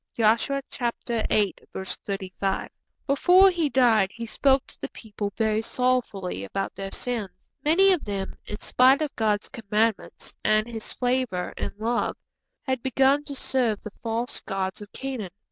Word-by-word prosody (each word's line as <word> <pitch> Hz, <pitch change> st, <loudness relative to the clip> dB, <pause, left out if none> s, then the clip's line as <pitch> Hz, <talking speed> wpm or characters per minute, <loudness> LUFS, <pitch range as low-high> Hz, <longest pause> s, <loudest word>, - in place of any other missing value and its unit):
_' -, -, -36 dB
(Joshua 230 Hz, +5 st, +2 dB, 0.4 s
viii. 215 Hz, -3 st, +1 dB, 0.2 s
35.) 190 Hz, 0 st, -3 dB, 0.3 s
Before 360 Hz, +7 st, +6 dB
he 335 Hz, -4 st, 0 dB
died 235 Hz, -6 st, +4 dB
he 230 Hz, 0 st, -6 dB
spoke 270 Hz, +4 st, +2 dB
to -, -, -14 dB
the -, -, -4 dB
people 205 Hz, -2 st, -5 dB
very 220 Hz, -1 st, +2 dB
sorrowfully 225 Hz, -, -1 dB
about 195 Hz, -, -3 dB
their 195 Hz, 0 st, -6 dB
sins. 230 Hz, -6 st, -4 dB
Many 380 Hz, +6 st, +5 dB
of 350 Hz, -, -1 dB
them, 195 Hz, -2 st, -3 dB
in 210 Hz, -, -5 dB
spite 265 Hz, +4 st, +4 dB
of 300 Hz, -, -4 dB
God's 210 Hz, -2 st, 0 dB
commandments 220 Hz, -2 st, -1 dB
and 215 Hz, +1 st, +3 dB
His 225 Hz, -2 st, -5 dB
favour 245 Hz, -7 st, -1 dB
and -, -, -4 dB
love, 230 Hz, +3 st, 0 dB, 0.5 s
had 260 Hz, -2 st, -1 dB
begun 270 Hz, +3 st, +3 dB
to 280 Hz, -, -6 dB
serve 245 Hz, -6 st, 0 dB
the 215 Hz, -, -7 dB
false 230 Hz, +1 st, -2 dB
gods 190 Hz, -1 st, -3 dB
of 205 Hz, -, -10 dB
Canaan. 260 Hz, -8 st, -4 dB
230 Hz, 150 wpm, -26 LUFS, 205-260 Hz, 0.5 s, Before